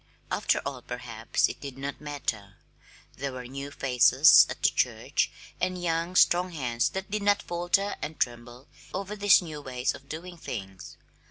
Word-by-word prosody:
After - - +1
all, - - -4
perhaps - - -1
it - - -8
did 140 -2 -7
not 140 +2 -5
matter; 115 -9 -4 0.6
there 140 +1 -3
were 125 -1 -7
new 140 +3 -6
faces 135 +2 +6
at - - -7
the - - +6
church, - - 0 0.3
and 185 0 -1
young, 170 +1 -1
strong 180 0 +4
hands 120 -6 0
that 190 +1 -6
did 210 0 -1
not 205 0 +2
falter 175 +4 0
and 150 0 -6
tremble 120 +1 -3 0.3
over 200 +2 -4
these 205 -2 +5
new 155 -3 -7
ways 125 -2 -2
of 140 - -14
doing 175 +3 -7
things. 95 -9 -7
145 Hz, 165 wpm, -27 LUFS, 125-180 Hz, 0.6 s, faces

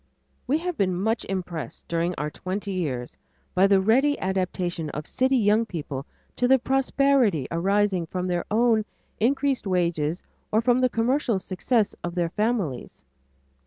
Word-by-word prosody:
We 280 +4 +3
have 350 0 -4
been 185 -4 +1
much 220 +4 0
impressed 175 -8 -5
during 170 +1 -1
our 150 +1 -2
twenty 195 +4 -4
years, 140 -10 -3 0.3
by 190 +2 +5
the 195 -1 +5
ready 260 +9 +3
adaptation 180 -3 -2
of 150 +1 -5
city 260 +6 +1
young 215 0 +3
people 145 -9 -6 0.3
to 245 - +2
the 265 +1 +6
prosperity 265 - +2
arising 190 0 +1
from 180 +2 -3
their 175 -1 -1
own 225 0 +3 0.4
increased 270 0 +1
wages 170 -3 0 0.3
or 215 - +3
from 245 +2 +3
the 255 - +3
commercial 240 0 +1
success 200 +4 0
of 175 0 -4
their 170 -2 0
families. 210 - -2
195 Hz, 150 wpm, -25 LUFS, 175-240 Hz, 0.4 s, the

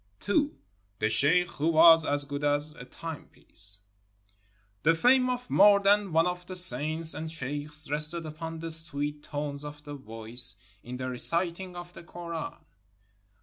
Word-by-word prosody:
II. 285 +8 +2 0.5
THE 110 +2 0
SHEIKH 165 +10 +3
WHO 155 - 0
WAS 165 0 +6
AS 145 0 +1
GOOD 145 0 -6
AS 145 +1 -1
A 125 - -11
TIMEPIECE 115 -9 -7 1.0
The 165 +2 +3
fame 255 +7 +3
of 250 0 -4
more 200 +1 +6
than 200 -1 +2
one 165 +1 +3
of 180 0 -3
the 185 - -7
saints 160 0 +1
and 160 +2 -6
sheikhs 150 0 -1
rested 150 +3 0
upon 160 +1 -7
the 165 0 -3
sweet 150 -2 -2
tones 145 -1 -6
of 150 0 -10
the 145 - -9
voice 115 -3 +2 0.3
in 125 +1 -8
the 130 0 -5
reciting 170 +8 +1
of 175 0 -10
the - - -11
Koran. 170 -1 -7
155 Hz, 155 wpm, -28 LUFS, 145-175 Hz, 1.0 s, WAS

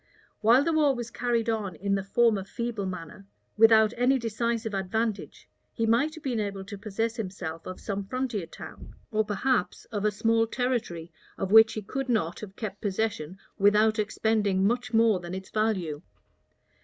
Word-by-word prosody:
While 235 +5 +5
the 330 +2 0
war 295 -3 +3
was 240 -1 -5
carried 235 -2 0
on 215 -6 -1
in 200 +4 -1
the 195 -1 0
former 215 0 +2
feeble 225 -1 -4
manner, 185 +2 -8 0.3
without 220 0 +6
any 250 +3 +3
decisive 230 -1 -2
advantage, 205 +3 -2 0.3
he 225 - -1
might 250 +8 +2
have 315 - -12
been 245 -5 -1
able 200 -2 -3
to 205 +1 -8
possess 225 +3 -2
himself 185 -6 -5
of 185 - -7
some 200 -1 -4
frontier 245 -7 -2
town, - - -11 0.2
or 215 0 +2
perhaps 210 0 -1
of 205 -2 -2
a 210 - +4
small 225 +2 +1
territory, 225 -10 -2 0.3
of 195 -1 -3
which 220 0 +8
he 215 - -5
could 270 +5 -4
not. 180 -8 0
have 200 -2 -9
kept 205 -3 -6
possession 195 -4 -2 0.2
without 210 +2 +4
expending 210 -2 +1
much 245 +3 0
more 225 -4 +4
than 175 +1 -6
its 190 0 -8
value. 190 -9 -1
215 Hz, 170 wpm, -27 LUFS, 195-230 Hz, 0.3 s, which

